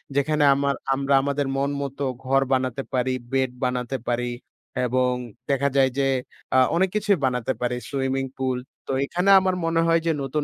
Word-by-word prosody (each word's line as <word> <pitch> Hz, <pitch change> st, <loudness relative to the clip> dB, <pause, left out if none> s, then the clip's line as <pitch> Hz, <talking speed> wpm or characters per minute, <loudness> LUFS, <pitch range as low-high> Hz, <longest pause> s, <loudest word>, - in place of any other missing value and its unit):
যেখানে 150 Hz, +2 st, +2 dB
আমার 140 Hz, 0 st, 0 dB, 0.2 s
আমরা 140 Hz, +1 st, 0 dB
আমাদের 140 Hz, +1 st, -1 dB
মন 140 Hz, +1 st, +1 dB
মতো 140 Hz, 0 st, -4 dB, 0.2 s
ঘর 135 Hz, +1 st, +2 dB
বানাতে 130 Hz, 0 st, 0 dB
পারি, 130 Hz, 0 st, +1 dB, 0.2 s
বেড 130 Hz, -1 st, +1 dB
বানাতে 125 Hz, +1 st, -2 dB
পারি 120 Hz, 0 st, -1 dB, 0.5 s
এবং 125 Hz, +1 st, +1 dB, 0.4 s
দেখা 140 Hz, 0 st, +2 dB
যায় 130 Hz, -1 st, +5 dB
যে 135 Hz, -1 st, +2 dB, 0.5 s
আ -, -, +6 dB, 0.2 s
অনেক 190 Hz, +2 st, +3 dB
কিছুই 205 Hz, -2 st, +2 dB
বানাতে 125 Hz, 0 st, 0 dB
পারি। 125 Hz, 0 st, 0 dB
Swimming 135 Hz, -1 st, -1 dB
pool. 130 Hz, -1 st, -1 dB, 0.3 s
তো -, -, -2 dB
এখানে 180 Hz, +6 st, 0 dB
আমার 185 Hz, -1 st, 0 dB
মনে 165 Hz, 0 st, +2 dB
হয় 165 Hz, 0 st, +4 dB
যে 165 Hz, -, +3 dB
নতুন, 140 Hz, +2 st, -1 dB
135 Hz, 175 wpm, -24 LUFS, 130-145 Hz, 0.5 s, আ